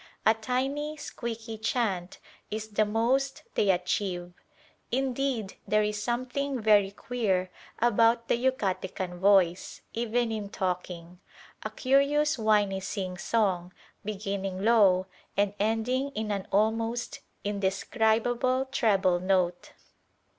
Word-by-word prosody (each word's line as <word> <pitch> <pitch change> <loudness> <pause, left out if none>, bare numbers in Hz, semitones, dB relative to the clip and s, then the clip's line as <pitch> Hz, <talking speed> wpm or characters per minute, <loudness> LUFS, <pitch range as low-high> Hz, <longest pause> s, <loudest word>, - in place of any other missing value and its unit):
A 220 - +7
tiny, 270 +7 -2
squeaky 230 -5 -6
chant 205 -6 -1 0.3
is 215 0 -4
the 215 0 +2
most 245 +6 0
they 205 - +2
achieve. 180 -1 0 0.6
Indeed 260 -5 -1
there 215 0 +3
is 210 0 -2
something 255 +3 -2
very 210 -3 +4
queer 195 -4 -1 0.3
about 230 0 +3
the - - +3
Yucatecan 190 -7 -2
voice, 190 -2 +3
even 235 0 0
in 210 -2 -4
talking: 180 -3 -4 0.4
a - - -4
curious 280 +2 +2
whiny 210 -3 +2
sing 190 -1 -4
song, 185 -5 0 0.3
beginning 195 -2 -3
low 200 -5 +5 0.3
and 200 0 +2
ending 225 +6 0
in 215 0 -2
an 200 -2 -3
almost 225 +3 0 0.2
indescribable 220 +6 +1
treble 195 -8 +2
note. 180 -1 0
215 Hz, 110 wpm, -28 LUFS, 195-240 Hz, 0.6 s, A